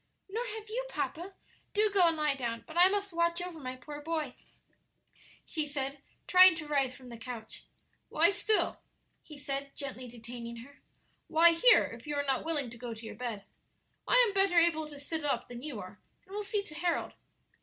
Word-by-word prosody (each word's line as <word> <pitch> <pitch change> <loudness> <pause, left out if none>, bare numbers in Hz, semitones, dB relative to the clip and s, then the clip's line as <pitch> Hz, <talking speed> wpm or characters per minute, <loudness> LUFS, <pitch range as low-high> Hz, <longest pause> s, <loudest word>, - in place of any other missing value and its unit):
"Nor 440 +5 -3
have 435 -1 -8
you, 475 +4 -3
papa; 375 -3 -4 0.4
do 425 0 +3
go 380 -4 +5
and 330 -1 +1
lie 300 -2 +2
down; 235 -4 -4
but 315 - -11
I 355 +1 +8
must 400 -1 -2
watch 340 +1 +1
over 350 -2 -6
my 255 -2 -5
poor 290 +3 -9
boy," 310 -4 -2 1.1
she 310 -2 -2
said, 275 -1 -3 0.2
trying 370 -1 +8
to 310 -2 -6
rise 275 -4 +1
from 255 -1 -13
the 235 - -8
couch. 230 -2 -7 0.4
"Lie - - +5
still," 410 +2 +1 0.4
he 300 - -12
said, 275 0 -4
gently 260 -3 -5
detaining 235 0 -8
her; 285 +1 -18 0.5
"lie 335 +1 +7
here, - - +6
if 230 +5 -8
you 295 - -2
are 285 0 0
not 270 -2 0
willing 290 -7 -1
to 235 - -10
go 240 -1 -5
to 220 +1 -10
your - - -6
bed. 230 -5 -5 0.6
I - - +3
am 405 - -3
better 390 -3 +3
able 320 -2 +3
to 290 - -10
sit 305 +2 -4
up 290 - 0
than 240 0 -8
you 275 -6 -5
are, 185 +1 -10 0.3
and 385 - -14
will 420 - -2
see 410 0 -1
to 310 - -10
Harold." 340 +2 -1
300 Hz, 200 wpm, -31 LUFS, 255-355 Hz, 1.1 s, I